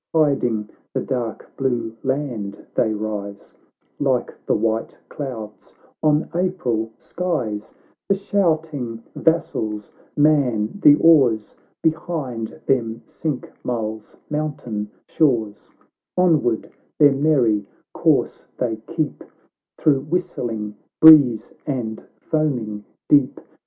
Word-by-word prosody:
Hiding 125 -9 +2 0.2
the - - +1
dark 120 -4 -4
blue 120 -4 -1
land 130 -7 -3
they 110 - +2
rise, 105 -2 -5 0.5
Like 130 -4 0
the - - +3
white 115 0 -1
clouds 115 -7 -7 0.3
on 150 0 +3
April 170 -12 -1
skies; 130 -13 -3 0.3
The 195 - +4
shouting 155 - -1
vassals 110 -10 0 0.3
man 140 - +2
the 145 - +8
oars, 135 -10 +4 0.3
Behind 155 -6 -2
them 115 -4 0
sink 150 -6 -4
Mull's 110 -3 -4
mountain 135 -9 -3 0.2
shores, 115 -9 0 0.5
Onward 155 -11 +2 0.3
their 145 -2 +6
merry 130 -8 +2 0.3
course - - +1
they 115 -3 -1
keep, 160 -3 -3 0.5
Through 140 -3 +3
whistling 120 -12 -2 0.2
breeze 145 -8 +8
and 120 -6 -3 0.2
foaming 120 -10 -1 0.2
deep. 140 -3 +4
125 Hz, 95 wpm, -22 LUFS, 110-155 Hz, 0.5 s, the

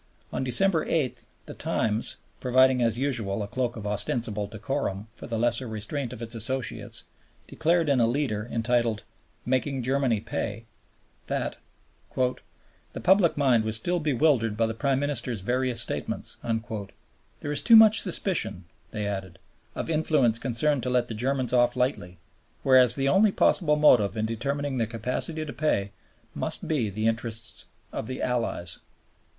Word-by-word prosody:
On - - -2
December 160 +6 +4
8, 145 -7 -2 0.2
the - - -8
Times, 110 +1 +1 0.2
providing 130 0 +3
as 115 -1 +1
usual 115 -7 -1
a - - -5
cloak 120 +2 -2
of 105 -3 -7
ostensible 105 0 -1
decorum 110 -2 -4
for - - -10
the 115 - -3
lesser 120 +2 +1
restraint 115 +4 -4
of 120 -2 -7
its 115 +1 -2
associates, 120 +3 -1 0.4
declared 170 0 +1
in 140 -3 +3
a 115 - +4
leader 120 -4 -2
entitled 115 -1 0 0.4
"Making 130 +1 -1
Germany 130 -3 +1
Pay," 105 +2 -5 0.6
that - - -3 0.6
"The 125 -1 -5
public 185 -3 +4
mind 130 -6 +3
was 110 0 +1
still 175 +11 +1
bewildered 135 -7 +1
by 115 - +2
the 110 - -2
Prime 135 +3 0
Minister's 130 -6 -2
various 125 +2 0
statements." - - -4 1.0
"There 145 - -4
is 145 - 0
too 230 - +6
much 220 -1 +8
suspicion," 155 - 0 0.3
they 105 -2 -4
added, 95 -3 -5 0.4
"of - - -4
influences 150 -7 +2
concerned 135 +3 +1
to 125 - -3
let 125 -1 +1
the - - -4
Germans 130 +3 -1
off 120 -1 +3
lightly, 125 -9 -2 0.5
whereas 130 -2 +5
the 135 -1 0
only 195 +7 +4
possible 155 -5 +3
motive 120 -8 +4
in 110 - 0
determining 140 +4 -2
their 115 - 0
capacity 125 +8 -3
to 145 - -7
pay 100 -10 0 0.4
must - - -3
be 135 -9 0
the 110 +2 -3
interests 115 -1 -2 0.2
of - - -5
the 130 - -5
Allies." 115 -8 -2
125 Hz, 155 wpm, -26 LUFS, 110-140 Hz, 1.0 s, much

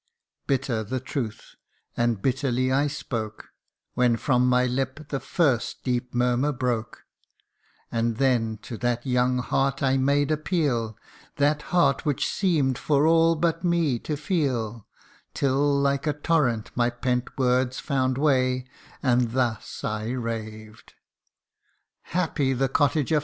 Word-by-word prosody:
Bitter 130 -5 0
the 130 +5 -3
truth, 125 -4 -5 0.4
and 120 -4 0
bitterly 130 -1 +1
I 140 +2 +2
spoke, 115 -6 -5 0.4
When 125 -2 +3
from 125 0 +2
my 125 0 +3
lip 135 +4 -3
the 135 - -2
first 140 -10 0
deep 125 -1 -2
murmur 125 +4 +2
broke; 120 -5 -3 0.9
And 115 -1 0
then 115 -5 +1
to 115 - -7
that 120 0 -1
young 125 0 +2
heart 135 +2 0
I 135 0 +3
made 140 +2 +2
appeal 145 - 0 0.4
That 145 +1 +2
heart 175 -1 +3
which 145 -5 0
seem'd 150 -10 +1
for 145 0 +2
all 165 +1 +4
but 165 +1 0
me 170 -8 +1
to 150 +4 -4
feel: 125 - -2 0.5
Till 140 +1 +2
like 140 +1 0
a 150 - +2
torrent 145 -7 0
my 120 0 +2
pent 125 +1 -2
words 130 -1 +1
found 130 -2 0
way, 130 -3 +2 0.5
And 120 -1 +2
thus 120 -4 -2
I 110 0 -2
raved: 110 -3 -6 0.3
" - - -49
' - - -50
Happy 150 -6 +1
the 135 +1 0
cottager 145 +2 +2
130 Hz, 135 wpm, -25 LUFS, 120-145 Hz, 0.9 s, all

